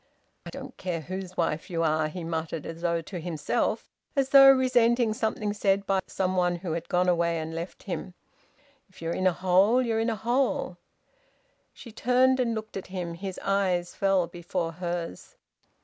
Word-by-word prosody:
"I -, -, -5 dB
don't 270 Hz, -1 st, -9 dB
care 175 Hz, -3 st, -3 dB
whose 185 Hz, +2 st, -7 dB
wife 165 Hz, -2 st, -1 dB
you 165 Hz, -2 st, -1 dB
are!" 155 Hz, -1 st, +2 dB
he 170 Hz, +3 st, -6 dB
muttered, 165 Hz, -1 st, -3 dB
as 165 Hz, 0 st, -7 dB
though 170 Hz, -1 st, 0 dB
to 175 Hz, +3 st, -7 dB
himself, 160 Hz, -3 st, -1 dB, 0.3 s
as 270 Hz, -1 st, +1 dB
though 275 Hz, 0 st, +9 dB
resenting 245 Hz, -3 st, +4 dB
something 215 Hz, -1 st, -1 dB
said 200 Hz, -1 st, +1 dB
by 195 Hz, -1 st, +2 dB
some 185 Hz, -1 st, -1 dB
one 180 Hz, -1 st, +2 dB
who 175 Hz, -1 st, -5 dB
had 165 Hz, +1 st, -4 dB
gone 180 Hz, -1 st, +2 dB
away 170 Hz, -1 st, +2 dB
and 160 Hz, 0 st, -4 dB
left 165 Hz, +2 st, -6 dB
him. 185 Hz, -1 st, -5 dB, 0.7 s
"If 185 Hz, -, -19 dB
you're 165 Hz, +1 st, -1 dB
in 185 Hz, -, +1 dB
a -, -, +5 dB
hole, 190 Hz, +7 st, +3 dB
you're 230 Hz, -3 st, 0 dB
in 225 Hz, +1 st, +1 dB
a 225 Hz, -, -1 dB
hole." 240 Hz, +6 st, 0 dB, 0.9 s
She 235 Hz, -, -12 dB
turned 255 Hz, +3 st, +3 dB
and 235 Hz, -2 st, +1 dB
looked 220 Hz, -1 st, -6 dB
at 190 Hz, -, -7 dB
him. 180 Hz, -2 st, -4 dB
His 190 Hz, +2 st, -6 dB
eyes 185 Hz, -3 st, 0 dB
fell 195 Hz, -2 st, +2 dB
before 175 Hz, 0 st, -4 dB
hers. 170 Hz, -, -5 dB
185 Hz, 180 wpm, -27 LUFS, 170-220 Hz, 0.9 s, though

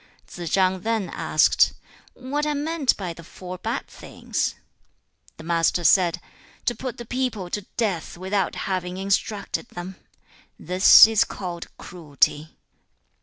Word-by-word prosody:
3. 175 Hz, -2 st, -8 dB
Tsze -, -, -5 dB
chang 190 Hz, -1 st, +2 dB
then 220 Hz, -1 st, -2 dB
asked, -, -, +3 dB, 0.4 s
'What 285 Hz, +4 st, -3 dB
are 300 Hz, -, 0 dB
meant 300 Hz, -1 st, 0 dB
by 180 Hz, -4 st, -5 dB
the 170 Hz, -, -13 dB
four 180 Hz, +2 st, -9 dB
bad 230 Hz, +6 st, -3 dB
things?' -, -, -4 dB, 0.8 s
The -, -, -11 dB
Master 170 Hz, +1 st, +1 dB
said, 175 Hz, -1 st, +4 dB, 0.5 s
'To 240 Hz, -, +1 dB
put 255 Hz, 0 st, -6 dB
the 240 Hz, -, -8 dB
people 225 Hz, -7 st, -3 dB
to 205 Hz, -2 st, -4 dB
death 195 Hz, -9 st, -2 dB
without 190 Hz, 0 st, -1 dB
having 185 Hz, -1 st, -3 dB
instructed 200 Hz, +3 st, -2 dB
them; 180 Hz, +2 st, -8 dB, 0.6 s
this 185 Hz, +3 st, +8 dB
is 220 Hz, -1 st, +3 dB
called 175 Hz, -3 st, -7 dB
cruelty. 155 Hz, -2 st, -1 dB
190 Hz, 135 wpm, -23 LUFS, 175-225 Hz, 0.8 s, this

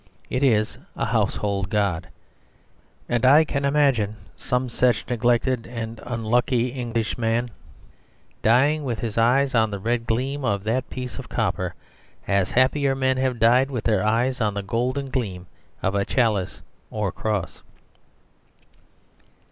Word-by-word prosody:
It 125 Hz, -, 0 dB
is 110 Hz, -5 st, +2 dB, 0.2 s
a -, -, -1 dB
household 100 Hz, -2 st, -1 dB
god. 100 Hz, -5 st, 0 dB, 1.0 s
And 120 Hz, 0 st, 0 dB
I 145 Hz, +5 st, +7 dB
can 140 Hz, -2 st, -2 dB
imagine 135 Hz, -8 st, +2 dB, 0.2 s
some 125 Hz, 0 st, -1 dB
such 120 Hz, -1 st, +1 dB
neglected 120 Hz, +1 st, +1 dB
and 115 Hz, -1 st, -6 dB
unlucky 120 Hz, +1 st, 0 dB
English 120 Hz, -3 st, -3 dB
man 115 Hz, +1 st, 0 dB, 0.9 s
dying 140 Hz, +7 st, +3 dB
with 120 Hz, -5 st, -2 dB
his 115 Hz, 0 st, -3 dB
eyes 130 Hz, +4 st, +3 dB
on 110 Hz, -2 st, +3 dB
the 100 Hz, -, -4 dB
red 115 Hz, +3 st, -2 dB
gleam 135 Hz, +5 st, -1 dB
of 100 Hz, -6 st, 0 dB
that 120 Hz, +4 st, -1 dB
piece 125 Hz, -1 st, -6 dB
of -, -, -9 dB
copper, -, -, -1 dB, 0.5 s
as 100 Hz, -2 st, +2 dB
happier 135 Hz, +2 st, +2 dB
men 130 Hz, -1 st, +1 dB
have 130 Hz, -2 st, 0 dB
died 125 Hz, +4 st, +4 dB
with 125 Hz, -5 st, -3 dB
their 105 Hz, -4 st, +2 dB
eyes 120 Hz, +4 st, +1 dB
on 105 Hz, -2 st, 0 dB
the 100 Hz, -, -3 dB
golden 130 Hz, +6 st, -2 dB
gleam 100 Hz, -9 st, -3 dB, 0.4 s
of 95 Hz, -, +1 dB
a 100 Hz, 0 st, +1 dB
chalice 105 Hz, -6 st, 0 dB, 0.3 s
or 105 Hz, -2 st, -2 dB
a -, -, -9 dB
cross. 105 Hz, -1 st, -3 dB
120 Hz, 145 wpm, -23 LUFS, 110-130 Hz, 1.0 s, I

